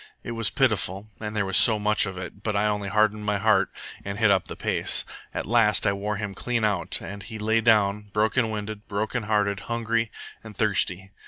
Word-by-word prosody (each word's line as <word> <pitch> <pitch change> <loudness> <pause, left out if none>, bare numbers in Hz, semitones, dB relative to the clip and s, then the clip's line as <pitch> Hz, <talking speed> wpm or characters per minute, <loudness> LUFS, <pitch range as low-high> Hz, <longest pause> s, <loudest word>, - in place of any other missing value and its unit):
It - - -6
was 115 -2 0
pitiful, 110 -5 0
and 105 0 -5
there 105 -2 0
was 95 - +2
so 110 - +8
I - - -2
much 105 0 +2
of 95 -1 -6
it, 90 +2 -8
but 105 0 -2
I 100 +1 +2
only 105 -1 -1
hardened 105 +1 +2
my 105 -1 0
heart 100 -2 +3 0.3
and 100 0 -5
hit 110 -2 +4
up 95 -2 +1
the - - -7
pace. - - +1 0.3
At - - -4
last 110 -2 +3
I 100 - +3
wore 105 +2 -3
him 100 -1 -4
clean 115 +3 -2
out, 100 -5 0
and 100 +3 -7
he 110 +3 -8
lay 110 +1 +1
down, 105 -2 +2
broken 110 +3 +1
winded, 105 0 -6
broken 110 +4 -2
hearted, 105 -2 0
hungry, 115 -1 -1 0.3
and 110 -3 -11
thirsty. 95 -3 0
105 Hz, 215 wpm, -25 LUFS, 100-110 Hz, 0.3 s, so